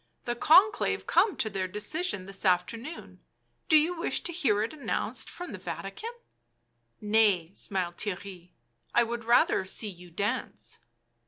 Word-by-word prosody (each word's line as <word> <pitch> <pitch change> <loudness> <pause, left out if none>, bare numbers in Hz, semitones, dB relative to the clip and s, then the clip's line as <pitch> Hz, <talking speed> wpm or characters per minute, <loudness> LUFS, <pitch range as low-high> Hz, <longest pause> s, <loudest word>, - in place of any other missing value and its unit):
" - - -43
The 240 - -1
Conclave 375 - +4
come 420 - +3
to - - 0
their 195 -3 -2
decision 210 - -3
this 195 0 -8
afternoon; 225 - -1 0.5
do 315 - +8
you 325 +4 +2
wish 335 +3 0
to 345 - -3
hear 225 - +2
it 225 - -4
announced 300 - -3
from 355 0 -8
the - - -7
Vatican?" 455 - -6 0.6
" - - -46
Nay," 195 -7 +4
smiled 180 -4 -2
Theirry. 185 -3 -5 0.2
" 115 0 -22
I 240 - +6
would 235 0 -4
rather 235 -4 +4
see 205 +3 -1
you 180 -2 -12
dance." 205 +9 -4
215 Hz, 160 wpm, -29 LUFS, 185-300 Hz, 0.6 s, do